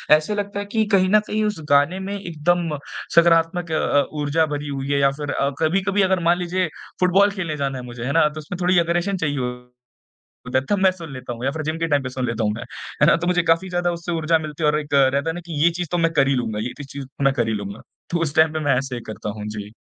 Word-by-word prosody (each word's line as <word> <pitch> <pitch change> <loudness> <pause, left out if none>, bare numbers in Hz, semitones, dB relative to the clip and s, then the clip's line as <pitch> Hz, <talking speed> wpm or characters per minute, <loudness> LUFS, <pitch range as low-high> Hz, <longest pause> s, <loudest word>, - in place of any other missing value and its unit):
ऐसे 155 +7 -1
लगता 200 0 -3
है 205 - -4
की 220 -1 +2
कहीं 185 -1 +3
न 215 +1 +6
कहीं 215 +1 0
उस 210 -6 -2
गाने 145 +6 +3
में 195 +1 -4
एकदम 170 -2 -1 0.4
सकारात्मक 170 0 +4
अ - - +1
अ, 145 -1 +2
ऊर्जा 150 +1 +1
भरी 145 +1 -5
हुई 140 -1 -4
है 140 - +2
या 140 0 +4
फ़िर 145 - -2
अ, 140 - 0
कभी-कभी 190 +5 +1
अगर 190 -1 +2
मान 170 +1 +4
लीजिए 180 +1 0 0.3
फ़ुटबॉल 195 +3 +4
खेलने 170 -6 -4
जाना 135 -1 -2
है 125 - -7
मुझे। 120 -1 -8
है 140 - -1
ना? 165 -1 +4
तो 155 +1 -8
उसमें 155 +4 -7
थोड़ी 180 +1 +3
अग्रेशन 175 +3 0
चाहिए 145 -4 -1
हो 125 0 -5 1.0
तब 205 - +2
मैं 190 0 +5
सुन 170 -5 -9
लेता 130 -2 -6
हूँ 120 +2 -9
या - - +2
फ़िर 160 +2 -4
जिम 155 +1 -2
के 165 - 0
टाइम 145 -3 +1
पे 130 - -4
सुन 130 0 -3
लेता 115 -2 -2
हूँ 105 - +1
मैं। 105 - -5 0.4
है - - +7
ना? - - +6
तो 170 +1 -2
मुझे 180 -1 +2
काफ़ी 165 +3 +2
ज़्यादा 175 0 0
उससे 170 +1 -5
ऊर्जा 165 0 +2
मिलती 155 0 -6
है - - +4
और 150 - +1
एक 145 -1 -7
रहता 140 +2 +3
है 160 - -1
ना 175 - -6
कि 155 -4 -4
ये 170 - +6
चीज़ 175 - -2
तो 175 - +1
मैं 165 -1 +2
कर 135 -4 +3
ही 135 - +2
लूँगा। 110 -4 -2
ये 120 +3 -3
तो 145 - -7
चीज़ 135 0 -8 0.2
मैं 135 0 +4
कर 120 -3 0
ही 110 - 0
लूँगा। 100 0 -5 0.3
तो 170 - +1
उस 155 -1 -2
टाइम 160 0 +4
पे 155 - -1
मैं 130 - +4
ऐसे 125 -2 -3
करता 110 -1 -5
हूँ। 105 - -5
जी। 105 -1 -6
155 Hz, 280 wpm, -22 LUFS, 135-175 Hz, 1.0 s, है